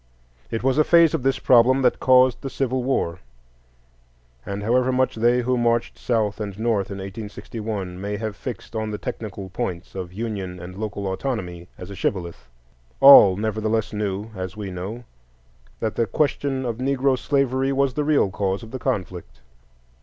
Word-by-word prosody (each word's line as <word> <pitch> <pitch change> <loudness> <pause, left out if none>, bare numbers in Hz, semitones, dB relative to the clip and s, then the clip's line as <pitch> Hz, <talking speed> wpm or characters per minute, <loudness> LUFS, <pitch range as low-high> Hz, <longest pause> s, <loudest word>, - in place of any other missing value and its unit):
It 115 - -3
was 135 +2 +2
a - - +6
phase 170 0 +5
of 160 - 0
this 135 +1 +1
problem 130 +2 +4
that 125 - +2
caused 130 -1 +4
the 135 - -4
Civil 130 -1 -1
War; 120 -10 -1 1.2
and 100 +6 -5
however 125 +4 +2
much 130 0 +1
they 120 +2 +2
who 125 0 0
marched 115 0 +1
South 110 -4 0
and 100 -2 -5
North 110 -3 0
in 100 - -6
1861 100 -1 -6
may 105 +1 -3
have 110 -1 -4
fixed 120 -1 -8
on 110 -1 -2
the 105 - -4
technical 105 -4 -6
points, 95 -5 -4
of 90 -2 -6
union 95 -3 -5
and 90 +2 -9
local 100 -1 -4
autonomy 95 -4 -4
as 90 +1 -9
a - - -7
shibboleth, 85 -11 -3 0.5
all 100 -9 +9
nevertheless 110 -1 -1
knew, 105 +1 -3
as 95 +2 -6
we 100 -3 -5
know, 95 +7 -6 0.8
that 110 -1 -1
the 115 - 0
question 135 +2 -1
of 115 -2 -3
Negro 135 +1 +1
slavery 135 0 0
was 135 -1 +1
the 150 - -1
real 145 -10 +2
cause 100 +1 -2
of 115 - -11
the 130 - -5
conflict. 90 - -4
110 Hz, 170 wpm, -23 LUFS, 95-130 Hz, 1.2 s, all